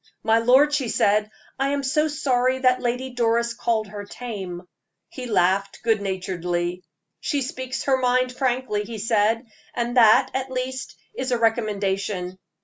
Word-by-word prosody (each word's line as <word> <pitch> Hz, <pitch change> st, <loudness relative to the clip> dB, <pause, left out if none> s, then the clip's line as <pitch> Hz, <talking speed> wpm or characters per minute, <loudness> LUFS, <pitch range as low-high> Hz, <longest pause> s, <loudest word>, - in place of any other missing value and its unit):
"My 225 Hz, 0 st, +4 dB
lord," 260 Hz, +6 st, +5 dB
she 270 Hz, -5 st, 0 dB
said, 210 Hz, 0 st, +2 dB, 0.3 s
"I 270 Hz, -, +2 dB
am 280 Hz, 0 st, -1 dB
so 300 Hz, +3 st, +2 dB
sorry 260 Hz, -4 st, +1 dB
that 255 Hz, -1 st, +2 dB
Lady 250 Hz, +2 st, -2 dB
Doris 235 Hz, -1 st, +1 dB
called 230 Hz, -2 st, 0 dB
her 205 Hz, 0 st, -7 dB
tame." 200 Hz, -5 st, -7 dB, 0.5 s
He 255 Hz, -2 st, -7 dB
laughed 195 Hz, -1 st, +1 dB
good 225 Hz, -2 st, +2 dB
naturedly. 180 Hz, -2 st, -3 dB, 0.4 s
"She 285 Hz, -5 st, -1 dB
speaks 260 Hz, 0 st, -4 dB
her 270 Hz, -1 st, +2 dB
mind 255 Hz, 0 st, +2 dB
frankly," 250 Hz, -5 st, -1 dB
he 225 Hz, +1 st, -7 dB
said, 225 Hz, +2 st, +1 dB, 0.3 s
"and 240 Hz, +1 st, -1 dB
that, 240 Hz, +2 st, +6 dB
at 265 Hz, 0 st, -2 dB
least, 255 Hz, 0 st, -4 dB, 0.2 s
is 260 Hz, 0 st, -3 dB
a 245 Hz, -, +2 dB
recommendation. 200 Hz, -5 st, -1 dB
235 Hz, 150 wpm, -23 LUFS, 205-260 Hz, 0.5 s, that